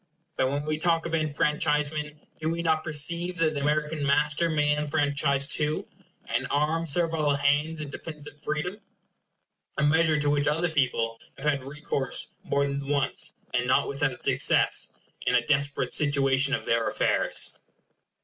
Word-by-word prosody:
But 130 - +1
when 145 +2 -2
we 155 0 -2
talk 165 0 +1
of 165 - -4
enfranchisement, 150 -1 0 0.2
do 160 - -1
we 170 +1 -2
not 160 -1 +1
perceive 170 +4 0
that 160 -1 +2
the 145 - -3
American 150 +1 0
master 150 +4 +2
may 150 -2 +2
enfranchise 145 -2 +1
too, 150 +2 0 0.4
and 120 +3 -1
arm 155 +3 0
servile 160 -2 +1
hands 145 +3 +1
in 145 -2 -6
defence 150 0 -8
of - - -9
freedom? 160 +7 -3 1.0
a - - +1
measure 160 +1 +4
to 145 0 +1
which 145 0 +1
other 165 +4 +1
people 125 -6 0 0.2
have - - -8
had 140 -3 +1
recourse 140 -1 -1
more 140 0 +1
than 140 0 -3
once, 140 -1 -1 0.2
and 125 0 +1
not 130 - +3
without 140 -1 -2
success, - - +3 0.3
in 125 - +3
a 120 -1 +2
desperate 145 -1 0
situation 140 -1 +2
of - - -6
their 115 -1 +1
affairs. - - +1
150 Hz, 160 wpm, -27 LUFS, 140-155 Hz, 1.0 s, measure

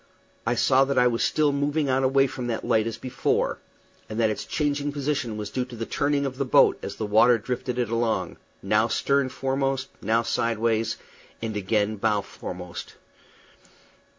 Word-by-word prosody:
I 120 - +2
saw 130 +3 +4
that 140 0 -2
I 125 - +5
was 120 -1 +2
still 150 -2 +2
moving 145 +1 0
on 130 0 +1
away 135 +1 +4
from 125 -2 -5
that 115 -2 -3
light 110 0 +2
as 115 -1 -4
before, 130 +1 -1 0.5
and 110 +1 -4
that 110 -2 +3
its 105 - -4
changing 145 -1 -1
position 140 -6 -2
was 105 -1 -5
due 130 - -1
to 125 -1 -10
the 115 0 -4
turning 140 +2 0
of 130 0 -5
the - - +2
boat 130 - +4
as - - -6
the 110 - -3
water 110 +4 +5
drifted 125 +2 -4
it 120 -3 -1
along, 115 -6 -1 0.3
now 105 +3 +3
stern 140 +4 +1
foremost, 135 0 -1
now 115 +1 +2
sidewise, 115 -1 0 0.4
and 110 -2 -4
again 105 +1 0
bow 105 0 +1
foremost. 90 -2 -8
120 Hz, 180 wpm, -25 LUFS, 110-135 Hz, 0.5 s, I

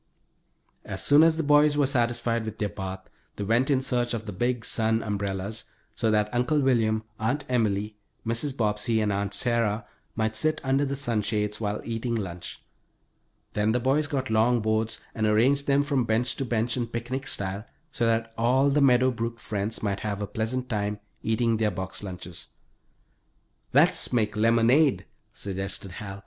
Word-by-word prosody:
As - - -4
soon 145 +1 +6
as 160 0 +5
the 165 - 0
boys 145 0 +4
were 145 - +4
satisfied 120 -3 0
with 110 -1 -6
their 105 - -1
bath 95 -1 -6 0.3
they 105 - -4
went 115 +6 +2
in 135 -2 +2
search 120 -2 0
of 110 -1 -5
the 105 - -6
big 120 +3 -1
sun 110 0 +1
umbrellas, 100 +1 -3 0.3
so 110 0 0
that 105 0 +1
Uncle 125 +5 +2
William, 115 -5 +2 0.2
Aunt 130 +6 -1
Emily, 105 -3 0 0.3
Mrs. 120 +5 -1
Bobbsey, 110 +1 +1
and 105 -2 +1
Aunt 100 0 -2
Sarah 115 -2 0 0.3
might 110 0 0
sit 155 +7 +1
under 135 +2 +2
the 140 0 -2
sunshades, 105 -4 -1
while 105 -1 -2
eating 115 +1 -2
lunch. 90 -5 -6 0.9
Then 105 +1 +1
the 125 - +2
boys 135 +4 +1
got 135 -4 -2
long 115 +2 +3
boards 110 0 -1
and 110 -1 0
arranged 130 +7 +3
them 140 0 +3
from 140 -4 0
bench 115 +3 +1
to 135 - -2
bench 115 0 0
in 120 -2 -2
picnic 120 +4 -4
style, 100 +2 -3 0.3
so 120 -4 0
that 115 0 0
all 130 +4 +3
the 145 +1 +2
Meadow 130 -1 +5
Brook 115 0 -4
friends 105 +1 -2
might 100 -2 -1
have 105 -2 -3
a 105 - -2
pleasant 115 +5 -3
time 105 -3 -2 0.2
eating 115 0 +1
their 110 -1 +2
box 95 0 -5
lunches. 90 -3 -8 1.2
"Let's - - +3
make 110 -3 +1
lemonade," 115 +6 +3 0.3
suggested 95 0 -4
Hal. 100 +1 -7
115 Hz, 170 wpm, -26 LUFS, 105-125 Hz, 1.2 s, soon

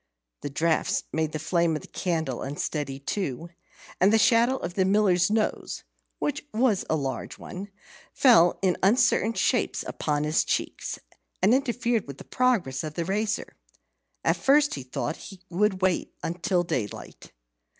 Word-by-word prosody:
The - - -4
draughts 160 +3 +1
made 160 -1 0
the 155 - -3
flame 165 +1 +1
of 150 - -5
the - - -11
candle 160 -8 -2
unsteady 140 0 -3
too, 165 +1 -4 0.5
and 190 +3 +5
the 225 - +5
shadow 235 +3 +4
of 175 -6 -5
the 190 - +2
Miller's 190 -2 +3
nose 215 0 -1 0.3
(which 295 0 -2
was 220 -3 +2
a - - +2
large 135 -3 -4
one) 195 +3 -8 0.4
fell 225 -10 +5
in 185 -2 +2
uncertain 230 +2 +3
shapes - - 0
upon 150 -1 -1
his 150 +1 +2
cheeks, - - -2 0.5
and 205 +5 +5
interfered 240 - 0
with 140 -1 -8
the - - -10
progress 225 - 0
of 155 -1 -6
the 170 - -2
razor. 210 +3 -2 0.7
At - - +2
first 290 +2 +4
he 135 - -4
thought 130 +5 -4
he 195 -2 -11
would 190 +1 +1
wait 185 -2 0 0.3
till 180 -3 +2
daylight. 115 - -5
180 Hz, 155 wpm, -26 LUFS, 155-220 Hz, 0.7 s, and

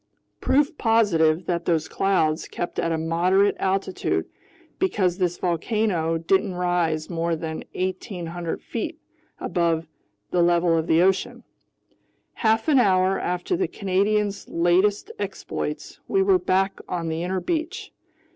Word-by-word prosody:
Proof 290 +3 +1
positive 180 -8 +3
that 170 -1 -2
those 160 -2 +1
clouds 165 -5 +1
kept 175 - -4
at 165 - 0
a 165 - 0
moderate 180 +5 +2
altitude, 190 0 -1 0.5
because 195 - +1
this 175 -1 0
volcano 175 -2 0
didn't 185 +3 +1
rise 175 -3 0
more 170 -1 -1
than 160 0 -5
1,800 175 -3 -4
feet - - -4 0.4
above 165 -2 0 0.5
the 180 - +2
level 170 0 +3
of 160 0 0
the 165 +2 +4
ocean. 190 0 0 0.9
Half 220 +3 +1
an 290 -4 +5
hour 190 -3 +3
after 180 - -1
the 375 +1 0
Canadian's 200 +1 0
latest 185 - +2
exploits, - - -5
we 390 0 +2
were 385 -1 +4
back 190 - 0
on 170 -2 -2
the 160 0 -2
inner 185 +2 -1
beach. 325 - -3
180 Hz, 130 wpm, -24 LUFS, 165-200 Hz, 0.9 s, an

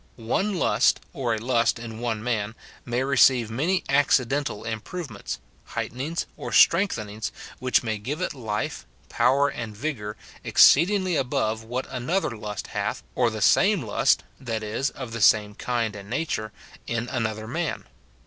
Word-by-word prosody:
] - - -34 0.2
One 200 -1 +1
lust, - - +3
or 125 -8 -1
a - - -3
lust 115 +1 +1
in 115 -1 -8
one 115 -3 -2
man, 110 -2 -1 0.3
may 120 +2 0
receive 130 -4 +4
many 165 +11 0
accidental 140 -3 +2
improvements, 120 +9 -5 0.4
heightenings, 145 +8 -3
and - - -5
strengthen 170 - +4
ings, 105 +2 -5 0.3
which 130 0 +2
may 110 -2 -2
give 135 +9 -4
it 180 - -2
life, 110 -6 -4 0.2
power, 135 +4 +3
and 115 -6 -6
vigour, 110 -6 -4 0.3
exceed 165 +7 +6
ingly 185 -5 +1
above 125 -5 -1
what 125 +3 -3
another 130 +2 -1
lust 105 -1 -5
hath, - - -2
or - - +2
the - - -5
same - - +4
lust - - +2 0.2
(that 115 -4 -3
is, 110 +6 -1
of 130 -4 -8
the 115 -1 -4
same 105 0 +5
kind 115 -1 -2
and 100 -1 -9
nature) 115 -5 -2 0.4
in 115 0 -2
another 110 -3 -2
man. 165 +6 -2
120 Hz, 160 wpm, -25 LUFS, 110-140 Hz, 0.4 s, exceed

